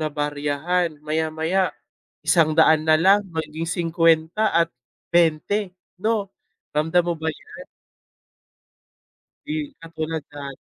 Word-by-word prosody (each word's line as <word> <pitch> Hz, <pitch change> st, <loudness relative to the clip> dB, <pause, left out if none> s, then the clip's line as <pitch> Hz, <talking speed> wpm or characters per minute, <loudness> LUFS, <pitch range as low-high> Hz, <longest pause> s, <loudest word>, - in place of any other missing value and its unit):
nabaryahan, 150 Hz, +3 st, -1 dB, 0.2 s
maya-maya 160 Hz, +3 st, 0 dB, 0.7 s
100 160 Hz, -1 st, +5 dB
na 155 Hz, 0 st, +6 dB
lang, 195 Hz, +3 st, +6 dB, 0.2 s
maging 160 Hz, +1 st, -3 dB
50 165 Hz, +2 st, +2 dB, 0.2 s
at 170 Hz, -, +3 dB, 0.5 s
20, 165 Hz, +2 st, +3 dB, 0.5 s
'no? 215 Hz, -2 st, +1 dB, 0.5 s
Ramdam 160 Hz, +4 st, +2 dB
mo 175 Hz, -, 0 dB
ba 160 Hz, 0 st, -2 dB
'yan? 155 Hz, -, -12 dB, 1.8 s
'Di, 150 Hz, -, -4 dB, 0.3 s
katulad 160 Hz, -1 st, -4 dB
da 140 Hz, -1 st, -7 dB
160 Hz, 95 wpm, -23 LUFS, 155-170 Hz, 1.8 s, na